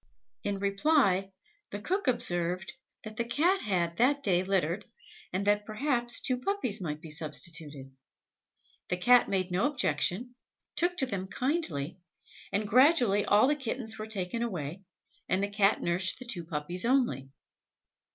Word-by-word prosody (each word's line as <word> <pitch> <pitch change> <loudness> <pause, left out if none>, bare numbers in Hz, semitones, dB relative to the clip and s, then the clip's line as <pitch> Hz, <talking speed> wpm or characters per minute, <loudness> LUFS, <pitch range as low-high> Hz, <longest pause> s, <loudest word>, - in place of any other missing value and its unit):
In 205 -1 -1
reply, 195 -1 +2 0.4
the 205 - -5
cook 370 - -1
observed 180 -6 0 0.3
that 215 -1 -9
the 235 - +1
Cat 330 +11 +2
had 175 -4 -1
that 280 +4 +3
day 180 -6 +3
littered, 190 0 0 0.5
and 190 +2 -2
that, 205 0 +3
perhaps, 240 +1 0
two 255 -1 -1
puppies 255 - -1
might 150 -4 -3
be 160 - -8
substituted. 150 -2 -5 1.0
The 180 - 0
Cat 245 +6 +5
made 185 -2 0
no 185 +10 +2
objection, 245 - -1 0.4
took 355 +1 +1
to 270 - +2
them 195 -6 -4
kindly, 190 - -2 0.5
and 210 +1 0
gradually 245 -5 +4
all 210 +4 +5
the 295 - +3
kittens 240 -5 -4
were 215 - -5
taken 210 +1 -3
away, 180 -6 -3 0.5
and 190 +2 +1
the 200 - 0
Cat 205 0 +2
nursed 175 +1 +1
the 255 - -9
two 190 -9 -4
puppies 165 +2 -3
only. 235 - +1
205 Hz, 150 wpm, -30 LUFS, 180-250 Hz, 1.0 s, Cat